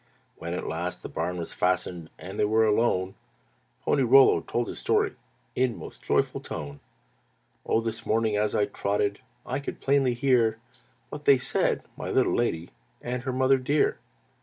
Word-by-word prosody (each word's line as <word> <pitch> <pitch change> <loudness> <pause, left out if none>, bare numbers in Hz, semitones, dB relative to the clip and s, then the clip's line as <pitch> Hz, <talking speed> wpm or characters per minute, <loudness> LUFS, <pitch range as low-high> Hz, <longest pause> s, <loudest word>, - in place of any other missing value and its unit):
When 85 +1 -5
at - - -4
last 85 +2 -4
the - - -6
barn 90 +3 -3
was 85 - -5
fastened 90 -2 -1
And 95 +3 -8
they - - +4
were 110 +1 +3
alone, 105 -4 +1 0.7
Pony 140 - +2
Rollo 135 +2 +6
told 120 -1 -2
his - - -6
story - - +1 0.4
In 125 -3 0
most - - -10
joyful - - 0
tone. 70 -1 -7 0.9
"Oh! 115 - +2
this 115 -1 -4
morning 110 -1 +1
as 105 +1 0
I 105 - +3
trotted 100 0 -1 0.3
I - - -2
could 140 - -6
plainly 135 -3 +2
hear 120 -4 +2 0.5
What 145 - -8
they 140 - +7
said, 130 +2 0
my - - -5
little - - +2
lady 85 -8 -1 0.3
And 125 +1 -3
her 130 - -1
mother 130 +1 +3
dear. 145 +4 +1
110 Hz, 165 wpm, -27 LUFS, 90-130 Hz, 0.9 s, they